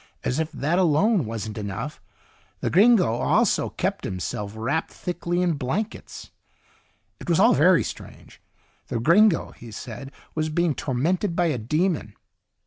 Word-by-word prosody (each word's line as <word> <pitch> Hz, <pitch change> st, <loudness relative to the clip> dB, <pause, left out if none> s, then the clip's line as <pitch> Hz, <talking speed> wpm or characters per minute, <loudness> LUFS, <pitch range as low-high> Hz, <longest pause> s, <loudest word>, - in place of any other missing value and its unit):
As 125 Hz, -, -1 dB
if 160 Hz, 0 st, -2 dB
that 160 Hz, +4 st, 0 dB
alone 185 Hz, -, +3 dB
wasn't 110 Hz, -1 st, -5 dB
enough, 105 Hz, +9 st, -5 dB, 0.6 s
the -, -, -2 dB
gringo 210 Hz, +2 st, +6 dB
also 125 Hz, -, +2 dB
kept -, -, -2 dB
himself 100 Hz, +3 st, -4 dB
wrapped 135 Hz, +9 st, -1 dB
thickly 175 Hz, 0 st, -2 dB
in 175 Hz, -2 st, +2 dB
blankets. 160 Hz, -, -4 dB, 0.9 s
It -, -, -8 dB
was 170 Hz, -, +3 dB
all 230 Hz, +5 st, +6 dB
very 180 Hz, +3 st, +5 dB
strange. -, -, -10 dB, 0.5 s
The 115 Hz, -, -2 dB
gringo, 170 Hz, -, +4 dB
he 120 Hz, -, -12 dB
said, 125 Hz, +5 st, -8 dB, 0.2 s
was 155 Hz, 0 st, -1 dB
being 170 Hz, 0 st, +1 dB
tormented 165 Hz, +9 st, -1 dB
by 175 Hz, -, +2 dB
a 125 Hz, -, -3 dB
demon. 150 Hz, -, -1 dB
155 Hz, 140 wpm, -24 LUFS, 120-180 Hz, 0.9 s, gringo